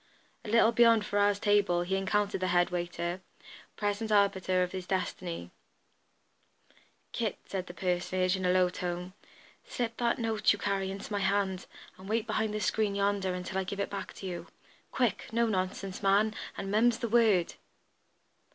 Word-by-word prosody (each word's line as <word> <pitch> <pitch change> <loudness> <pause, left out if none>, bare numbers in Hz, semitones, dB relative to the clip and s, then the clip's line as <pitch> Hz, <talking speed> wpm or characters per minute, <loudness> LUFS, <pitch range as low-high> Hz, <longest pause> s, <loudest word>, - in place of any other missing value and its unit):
A - - -7
little 230 +1 +5
beyond 230 -2 +5
Ferrars' 205 0 +2
table 205 -4 +2
he 190 +2 -1
encountered 195 0 0
the 185 - +1
head 175 0 +2
waiter, 175 0 -3 0.6
present 205 +1 -1
arbiter 190 -3 +3
of 180 - -3
his 185 -1 -6
destiny. 180 - -3 1.6
"Kit," - - -2
said 185 -2 -4
this 175 - -9
personage, 185 +1 0
in 190 - -4
a 180 - +2
low 185 0 +4
tone, 180 0 -4 0.5
"slip 230 -2 -4
that 235 0 +1
note 225 -3 +2
you 205 - 0
carry 195 -1 -1
into 195 +2 -7
my 205 - 0
hand 195 -1 0 0.3
and 190 +1 -10
wait 225 0 0
behind 215 -1 -1
the 215 - -2
screen 205 +1 0
yonder 200 -2 0
until 180 +1 -3
I - - 0
give 195 +2 -5
it 200 - -2
back 200 -1 -5
to - - -9
you. 180 -2 -5 0.4
Quick! 235 -5 0
No 235 +1 +2
nonsense, 190 -2 -2
man; 205 +2 +3 0.2
and 195 - -4
mum's 225 +2 +3
the 240 - -2
word!" 220 -6 +3
195 Hz, 170 wpm, -30 LUFS, 185-215 Hz, 1.6 s, little